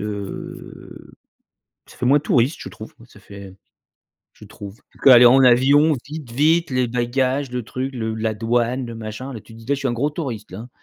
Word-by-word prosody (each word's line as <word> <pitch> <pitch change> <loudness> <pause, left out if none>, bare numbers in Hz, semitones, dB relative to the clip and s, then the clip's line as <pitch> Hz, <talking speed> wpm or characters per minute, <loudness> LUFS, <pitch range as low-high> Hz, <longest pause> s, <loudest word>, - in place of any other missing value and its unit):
heu 100 -1 -8 0.7
ça - - -17
fait - - -4
moins 145 +3 +4
touriste, 135 +2 +1
je - - -7
trouve. 110 - -11
Ça 105 - -19
fait 100 -2 -12 0.8
je - - -17
trouve 100 +6 -11 0.2
qu'aller 125 -3 +8
en 130 +3 +6
avion, 140 +5 +5
vite, 150 -4 -9
vite, 160 +6 +2
les 125 -1 0
bagages, 130 +3 -1
le 125 -1 -4
truc, 130 +4 -5
le 110 -3 -3
la 110 0 -2
douane, 120 +3 -1
le 115 -1 -8
machin, 115 +4 -7
là, 115 - -7
tu 115 - -17
te - - -13
dis: 115 - -14
«Là, 140 - +1
je - - -8
suis 135 - -2
un 120 - -1
gros 135 +5 -1
touriste, 120 - -6
hein». 115 +6 -9
125 Hz, 200 wpm, -20 LUFS, 110-135 Hz, 0.8 s, qu'aller